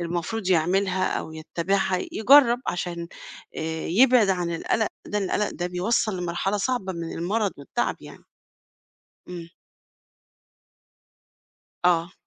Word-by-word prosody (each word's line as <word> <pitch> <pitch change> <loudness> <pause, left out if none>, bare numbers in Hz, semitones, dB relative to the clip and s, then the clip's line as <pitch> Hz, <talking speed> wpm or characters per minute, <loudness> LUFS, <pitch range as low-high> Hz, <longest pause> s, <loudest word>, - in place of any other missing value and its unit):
المفروض 175 +4 -3
يعملها 185 +2 +2
أو 160 - -7
يتّابعها، 180 +4 -1
يجرّب 245 +1 +6
عشان 170 -1 -3 0.5
آآ 160 0 -3
يبعد 235 +2 +5
عن 175 -2 -1
القلق 220 +6 0 0.2
ده، 210 - -1
القلق 205 +1 0
ده 175 - -3
بيوصل 190 +3 0
لمرحلة 180 +3 -1
صعبة 205 -3 -1
من 170 -1 -5
المرض 200 +5 -1
والتعب 140 -2 -2
يعني؟ - - -13 1.0
إمم. 170 -2 -7 2.4
آه. 175 +1 +3
185 Hz, 110 wpm, -25 LUFS, 170-210 Hz, 2.4 s, يجرّب